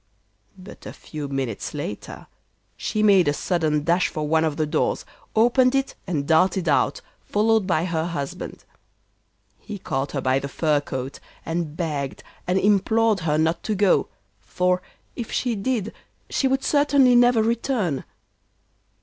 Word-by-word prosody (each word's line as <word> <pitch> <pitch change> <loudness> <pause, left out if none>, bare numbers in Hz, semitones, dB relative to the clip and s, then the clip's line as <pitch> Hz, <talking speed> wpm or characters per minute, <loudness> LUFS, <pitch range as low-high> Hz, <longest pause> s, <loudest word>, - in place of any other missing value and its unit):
But 185 +1 -12
a - - -7
few 150 -2 -7
minutes 135 -6 -4
later - - -6 0.5
she 215 - -2
made 195 -5 +5
a 145 - +3
sudden 155 -2 0
dash 170 +3 +2
for 155 -1 -4
one 160 +1 +3
of 155 -2 -1
the 155 - +1
doors, 150 +1 -1 0.3
opened 250 +3 +4
it 270 0 0
and 145 -5 -2
darted 175 +2 +3
out, 145 - +2 0.2
followed 215 -1 +2
by 170 -2 +1
her 165 -2 -1
husband. 145 -5 -5 1.0
He 210 - -7
caught 135 -6 -3
her 140 - -1
by 130 +1 +2
the 140 - -5
fur 150 +1 +1
coat, 135 -3 -5 0.3
and 165 -2 -3
begged 145 -6 -3 0.2
and 180 +1 +2
implored 210 +2 +3
her 155 -3 0
not 160 +2 +1
to 215 - -2
go, 200 -1 +3 0.3
for 180 - 0 0.3
if 235 -3 -6
she 245 -2 0
did 220 0 -2 0.4
she 270 - +1
would 265 0 0
certainly 285 -4 +4
never 240 -2 +5
return. 225 - -1
175 Hz, 150 wpm, -23 LUFS, 150-220 Hz, 1.0 s, made